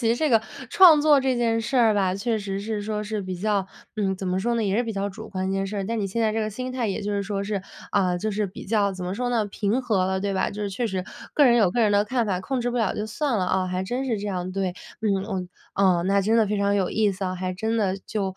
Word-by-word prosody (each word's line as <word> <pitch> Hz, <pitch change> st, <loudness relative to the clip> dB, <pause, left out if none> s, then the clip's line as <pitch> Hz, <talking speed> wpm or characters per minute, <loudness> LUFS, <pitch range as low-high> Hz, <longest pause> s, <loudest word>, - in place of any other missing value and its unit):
其 230 Hz, -, 0 dB
实 235 Hz, -, +3 dB
这 310 Hz, +2 st, +1 dB
个 225 Hz, -3 st, +4 dB, 0.3 s
创 335 Hz, -4 st, +7 dB
作 295 Hz, -2 st, +5 dB
这 260 Hz, -2 st, +1 dB
件 230 Hz, -1 st, +1 dB
事 260 Hz, +4 st, -2 dB
儿 225 Hz, -3 st, +5 dB
吧， 190 Hz, -2 st, +1 dB
确 220 Hz, +2 st, -1 dB
实 195 Hz, -1 st, -4 dB
是 210 Hz, 0 st, -3 dB
说 210 Hz, 0 st, -2 dB
是 210 Hz, -1 st, -3 dB
比 185 Hz, 0 st, -4 dB
较 200 Hz, 0 st, 0 dB, 0.3 s
嗯， 195 Hz, -2 st, 0 dB
怎 190 Hz, -, -5 dB
么 180 Hz, +1 st, 0 dB
说 235 Hz, +3 st, 0 dB
呢？ 225 Hz, -2 st, 0 dB
也 195 Hz, +1 st, +1 dB
是 240 Hz, -, +2 dB
比 225 Hz, -2 st, -4 dB
较 200 Hz, 0 st, -2 dB
主 215 Hz, +3 st, -9 dB
观 185 Hz, -1 st, -3 dB
的 -, -, -1 dB
一 -, -, -1 dB
件 195 Hz, 0 st, -1 dB
事 205 Hz, +2 st, -5 dB
儿， 195 Hz, -1 st, -2 dB
但 230 Hz, 0 st, -2 dB
你 200 Hz, -, -1 dB
现 230 Hz, +5 st, -3 dB
在 220 Hz, -1 st, +2 dB
这 225 Hz, -, -1 dB
个 215 Hz, -, -1 dB
心 255 Hz, +4 st, -5 dB
态 245 Hz, -3 st, -1 dB
也 195 Hz, -, -2 dB
就 205 Hz, +1 st, -2 dB
是 200 Hz, 0 st, 0 dB
说 200 Hz, 0 st, -3 dB
是 200 Hz, -2 st, -2 dB, 0.3 s
啊， 185 Hz, -3 st, +2 dB
就 215 Hz, +3 st, -2 dB
是 210 Hz, 0 st, -1 dB
比 190 Hz, -, -10 dB
较 205 Hz, -2 st, +2 dB
怎 185 Hz, -1 st, -6 dB
么 185 Hz, +2 st, -3 dB
说 245 Hz, +2 st, -2 dB
呢？ 225 Hz, -4 st, +1 dB
平 205 Hz, +5 st, -1 dB
和 210 Hz, -7 st, +1 dB
了， 190 Hz, 0 st, -1 dB
对 200 Hz, -1 st, -1 dB
吧？ -, -, 0 dB
就 210 Hz, -, -7 dB
是 205 Hz, -, -1 dB
确 230 Hz, +5 st, -2 dB
实 190 Hz, -3 st, -3 dB, 0.3 s
各 290 Hz, -, +5 dB
人 240 Hz, -2 st, +6 dB
有 205 Hz, -6 st, +4 dB
各 240 Hz, -, 0 dB
人 215 Hz, -2 st, +4 dB
的 205 Hz, +1 st, +4 dB
看 235 Hz, 0 st, 0 dB
法， 185 Hz, -2 st, -1 dB
控 255 Hz, +6 st, -2 dB
制 245 Hz, +1 st, -1 dB
不 245 Hz, -, -3 dB
了 225 Hz, -, +1 dB
就 210 Hz, +1 st, -3 dB
算 230 Hz, +1 st, -1 dB
了 180 Hz, -, 0 dB
啊。 185 Hz, 0 st, +1 dB
还 185 Hz, +1 st, -2 dB
真 250 Hz, +6 st, -2 dB
是 230 Hz, -5 st, -1 dB
这 205 Hz, -, -5 dB
样， 185 Hz, -2 st, -3 dB
对， 190 Hz, -2 st, -1 dB, 0.3 s
嗯， 200 Hz, -3 st, 0 dB
哦， 190 Hz, -4 st, -3 dB, 0.3 s
哦。 185 Hz, -3 st, +3 dB
那 200 Hz, 0 st, +3 dB
真 220 Hz, +4 st, +2 dB
的 220 Hz, -2 st, +4 dB
非 205 Hz, 0 st, -1 dB
常 200 Hz, 0 st, +2 dB
有 190 Hz, -3 st, +1 dB
意 215 Hz, -2 st, +2 dB
思 190 Hz, +1 st, -5 dB
啊， 185 Hz, 0 st, -2 dB
还 185 Hz, 0 st, -3 dB
真 220 Hz, +4 st, -1 dB
的 195 Hz, -3 st, +1 dB
就 195 Hz, -3 st, -2 dB
205 Hz, 335 characters per minute, -24 LUFS, 190-225 Hz, 0.3 s, 创